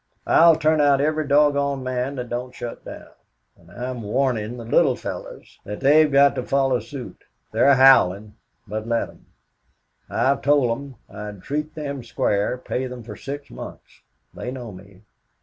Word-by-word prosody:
I'll 165 0 +6
turn 155 0 +2
out 140 -1 +4
every 155 +1 0
doggone 140 -1 +2
man 130 +2 -2
that 125 -2 -5
don't 125 +1 -5
shut 120 - -7
down. - - -10 0.4
And 85 - -22
I'm 125 +5 -6
warnin' 115 0 -1
the 115 - -8
little 130 +3 +3
fellows - - -8
that 105 +1 -7
they've 150 +2 +5
got 140 0 +5
to 125 - -3
follow 135 -2 +1
suit. 125 +4 -9 0.3
They're 130 +5 +4
howling, 105 -6 +5 0.3
but 110 +2 -5
let 115 0 0
'em. - - -19 0.8
I - - -2
have 135 +2 +2
told 140 -4 +3
them 135 +2 -5
I'd 105 -1 -9
treat 150 +2 -4
them 140 -4 -5
square, 105 0 -1
pay 130 +1 -3
them 125 -1 -8
for 105 -2 -9
six 140 +4 -7
months. - - -11 0.3
They - - -6
know 125 -3 -7
me. 95 +1 -15
130 Hz, 165 wpm, -22 LUFS, 115-140 Hz, 0.8 s, I'll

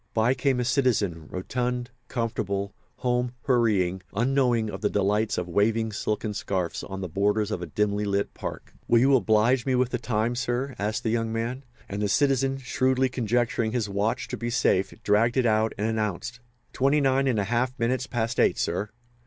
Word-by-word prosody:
By 115 +3 +3
came 130 0 +1
a 125 - 0
citizen, 110 - +1
rotund, 125 +6 -3 0.2
comfortable, 100 -4 -2 0.2
home 125 0 -1
hurrying, 105 -8 +2
unknowing 120 -1 +2
of 95 -2 -6
the 105 - +1
delights 105 +2 +1
of 90 - -2
waving 110 +5 +1
silken 105 0 -2
scarfs 90 -4 -2
on 95 -1 -6
the 95 - -3
borders 105 +4 0
of 90 -6 -5
dimly 105 0 +1
lit 100 0 -1
parks. - - -7
"Will 120 - +5
you 135 +3 +5
oblige 115 +3 +3
me 130 -2 +1
with 125 0 +1
the 125 - -1
time, 115 0 0
sir?" 125 +2 -2
asked 105 +2 -1
the 110 - 0
young 115 -1 0
man; 115 +4 -3 0.2
and 100 +1 -4
the 105 - 0
citizen, 135 +5 +2
shrewdly 130 0 +1
conjecturing 120 -2 0
his 120 -4 0
watch 110 +4 -1
to - - -4
be 120 - -3
safe, 100 -5 +2
dragged 115 +4 +3
it 130 - +3
out 110 0 +2
and 105 - -1
announced: 110 +1 -2 0.3
"Twenty 140 +3 +3
nine 135 -1 +2
and 125 -4 +1
a 100 - +1
half 120 +5 -1
minutes 125 +2 0
past 120 0 -2
eight, - - +3
sir." 105 - -1
115 Hz, 185 wpm, -26 LUFS, 105-125 Hz, 0.3 s, Will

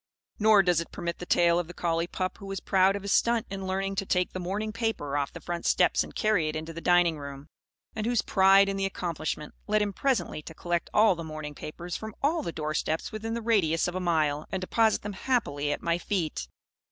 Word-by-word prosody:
Nor 215 -2 +6
does 175 -2 +2
it 170 - -9
permit 170 -2 -4
the 180 - -7
tale 170 0 +4
of 175 - -3
the 175 - -10
collie 165 0 0
pup 185 0 -3
who 200 - -9
was 195 -1 -4
proud 190 +1 +3
of 200 - -5
his 200 - -2
stunt 235 -1 +3
in 195 -1 -4
learning 195 +1 -1
to 195 - 0
take 180 -1 +1
the 185 - -4
morning 205 +4 -3
paper 225 -12 -2
off 140 -1 -1
the - - -9
front 175 -1 -4
steps - - +3
and - - -12
carry 215 -8 +2
it 155 - -4
into 160 +1 -5
the 165 - -7
dining 175 -3 +3
room; 140 +1 -9 0.5
and 215 0 -2
whose 240 -2 +2
pride 195 +1 +5
in 195 0 -2
the 195 - 0
accomplishment 160 -5 -4
led 210 0 +3
him 205 -1 -3
presently 260 - 0
to 165 +1 -11
collect 175 0 -2
all 215 -1 +5
the 170 -1 -6
morning 155 -2 -6
papers 170 +4 -7
from 220 -1 -6
all 320 +4 +2
the 170 - -4
door 155 -1 -3
steps 160 +1 -1
within 225 +1 -4
the 235 - -4
radius 180 -9 +2
of 175 - -3
a 185 - -2
mile 155 -4 0
and 190 - -2
deposit 220 +3 +2
them 205 0 -4
happily 165 - -1
at - - -3
my 170 0 +1
feet. 165 - -2
180 Hz, 240 wpm, -28 LUFS, 165-205 Hz, 0.5 s, Nor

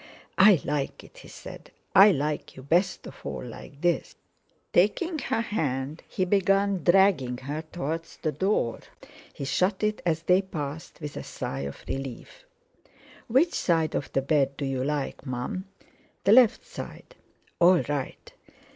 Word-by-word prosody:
"I 195 -3 +8
like 145 -2 -2
it," - - -16
he - - -13
said: - - -11 0.2
"I 195 +3 +9
like 150 -2 -2
you 130 - -10
best 170 +7 +1
of - - -10
all - - -5
like 140 - -11
this." 175 -1 0 0.6
Taking 310 - +2
her 225 -4 -1
hand, 145 - -2
he 185 - -1
had 185 - -4
begun 195 -1 +2
dragging 175 -9 +4
her 145 +4 -4
towards 165 0 -4
the 155 - -1
door. 150 - 0 0.5
He 140 - -6
shut 185 +8 0
it 215 0 0
as 165 -2 0
they 180 +2 +4
passed, 160 -4 -6
with 150 -2 -6
a - - -5
sigh 70 +1 -5
of 70 - -13
relief. 135 - -6 0.8
"Which 270 +9 +3
side 165 -3 +1
of 140 - -3
the 135 - +1
bed 140 -1 +1
do 140 - -2
you 135 -1 -1
like, 140 -1 -2
Mum?" 130 +8 -4 0.6
"The 195 - +4
left 245 -2 +5
side." - - -9 0.5
"All 175 0 +6
right." 145 -2 -4
160 Hz, 155 wpm, -27 LUFS, 140-195 Hz, 0.8 s, I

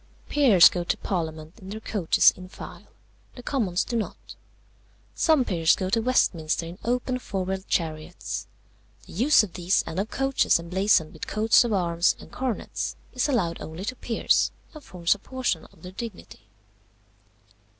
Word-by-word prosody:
"Peers 240 -12 +7
go 175 - -2
to - - -1
parliament 160 -3 -4
in 190 - -11
their 215 +2 -6
coaches 205 -6 +3
in 185 0 -11
file; - - -11 0.5
the 245 - -10
Commons 205 -11 0
do 240 - -5
not. 225 - -5 0.8
Some 310 -6 +3
peers 165 -5 +3
go 185 0 -3
to 230 - +2
Westminster 170 -10 +1
in 170 +4 -9
open 250 +1 -1
four 195 -6 -4
wheeled 190 +1 -4
chariots. 155 -3 -3 0.6
The - - -13
use 245 - +5
of 190 -5 -7
these 180 +1 +1
and 170 - -4
of 205 +3 -2
coaches 270 0 +2
emblazoned 180 -1 +1
with 160 - -7
coats 220 +2 +4
of 240 - -2
arms 175 -3 +2
and - - -13
coronets 255 -5 -3 0.2
is 255 +3 0
allowed 180 -11 0
only 160 +5 -7
to 255 - -3
peers, 235 -2 +1 0.2
and 305 -2 -11
forms 175 -2 0
a 205 - -11
portion 250 -9 -2
of 160 - -21
their 180 - -8
dignity. 220 0 -9
190 Hz, 165 wpm, -25 LUFS, 170-240 Hz, 0.8 s, Peers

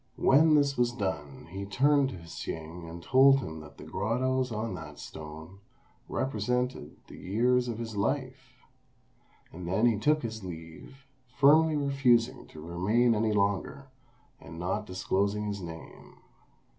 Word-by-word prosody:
When 155 +3 +5
this 140 -3 +2
was 120 -1 +3
done, 75 - -4
he 95 +1 -5
turned 140 +6 +3
to - - -7
Hsing 80 +1 -7
and 85 +1 -9
told 135 +5 +6
him 80 -12 -6
that 75 -1 -13
the - - -10
grottoes 125 +5 -1
on 110 -1 -3
that 75 -4 -8
stone 80 +4 -10 0.5
represented 125 - -2
the - - -12
years 125 +6 +1
of 115 -2 -3
his 115 -2 -6
life; 130 +4 -3 0.9
and 85 +1 -7
then 95 +6 +2
he 115 -4 +3
took 150 +5 +2
his 110 -2 -5
leave, 85 +10 -10 0.3
firmly 155 +3 +5
refusing 130 -3 +2
to 80 - -13
remain 95 +9 +1
any 110 0 +1
longer, 100 +6 -1 0.5
and 80 +3 -11
not 95 +5 -2
disclosing 100 +3 -1
his 100 -1 -4
name. 80 -2 -10
110 Hz, 145 wpm, -29 LUFS, 90-130 Hz, 0.9 s, told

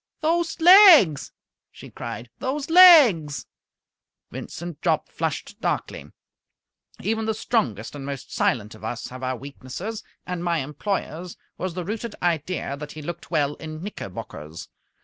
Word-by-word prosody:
"Those 335 +2 0
legs!" 335 - +7 0.4
she - - -13
cried. 120 0 -7
"Those 280 +3 -3
legs!" 245 - +7 0.9
Vincent 170 -3 -8
Jopp - - 0
flushed - - -4
darkly. - - -3 0.9
Even 220 +2 -1
the 220 0 -1
strongest 225 0 -1
and 145 -2 -8
most 140 -1 -7
silent 105 -3 0
of 110 - -15
us 115 +2 -5
have 130 +1 -10
our 130 0 -2
weaknesses, 140 - -7 0.2
and 180 -2 -4
my 170 -1 0
employer's 170 +3 -4 0.2
was 185 -2 -4
the 180 -2 -4
rooted 220 +3 -5
idea 165 -3 -2
that 150 0 -8
he 155 - -9
looked 175 +2 -7
well 145 -4 +1
in 155 0 -8
knickerbockers. 85 - -8
170 Hz, 135 wpm, -24 LUFS, 140-220 Hz, 0.9 s, legs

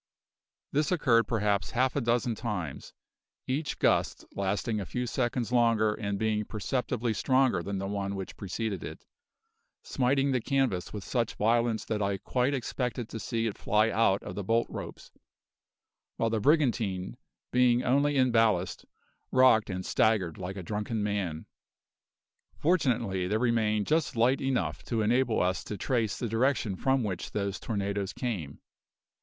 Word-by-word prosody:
This 150 +3 +1
occurred 125 -10 +3
perhaps 105 -4 0
half 130 +1 +1
a 140 - +1
dozen 120 0 +1
times, 105 - -5 0.5
each 145 +3 -2
gust - - +1
lasting 100 +3 -1
a - - -4
few 125 0 -2
seconds 120 0 -1
longer 115 -3 +3
and 100 -2 -3
being 110 0 0
perceptibly 120 +2 -2
stronger 130 -2 +2
than 100 +3 -4
the 95 - -3
one 100 0 -3
which 95 -1 -6
preceded 100 0 -4
it, - - -8 0.8
smiting 135 +2 +1
the 125 -2 +1
canvas 130 -9 0
with 105 -2 -6
such 115 -1 -1
violence 115 +1 +1
that 105 -1 -2
I 100 -1 0
quite 125 +7 0
expected 125 -2 -3
to 110 - -6
see 115 0 -2
it 110 - -3
fly 105 +2 +2
out 105 -3 +2
of - - -6
the 100 - -4
bolt 115 +4 +2
ropes, - - -8 1.1
while 115 - 0
the 110 - +1
brigantine, 110 - +1 0.4
being 125 -1 +4
only 140 +3 +2
in 130 -1 +4
ballast, 110 -6 +1 0.5
rocked 130 -5 +5
and 95 -1 -4
staggered 100 -7 +1
like 95 +2 -5
a 95 - -5
drunken 105 +3 -2
man. 100 -7 -2 1.1
Fortunately, 120 - +1
there 105 +3 +1
remained 110 -3 +1
just 155 -3 +1
light 120 +4 +3
enough 135 -2 -1
to 115 -3 0
enable 120 +1 +2
us 90 +1 0
to 105 - -5
trace 115 0 0
the 120 - -2
direction 115 -2 +1
from 135 +5 +1
which 95 -5 -4
those 100 -2 -2
tornadoes 100 -2 -2
came. 95 - -4
115 Hz, 155 wpm, -29 LUFS, 100-125 Hz, 1.1 s, rocked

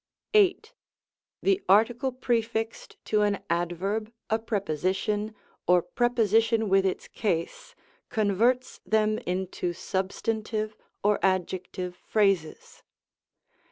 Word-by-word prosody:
8. 425 +2 +3 0.7
The 390 0 +3
article 235 +6 +4
prefixed 230 -3 -2
to 215 -1 +2
an 205 -1 +1
adverb, 185 +6 -1 0.2
a 220 - +3
preposition, 205 +1 -1 0.3
or 180 -1 +5
preposition 225 -2 +2
with 195 0 +4
its 185 - -3
case, 170 -7 -3 0.3
converts 230 +3 +1
them 215 0 +2
into 180 -1 -2
sub 185 +1 -2
stantive 215 0 -2 0.3
or 210 0 +3
adjective 185 -1 -1
phrases. 195 -5 0
210 Hz, 95 wpm, -27 LUFS, 185-225 Hz, 0.7 s, or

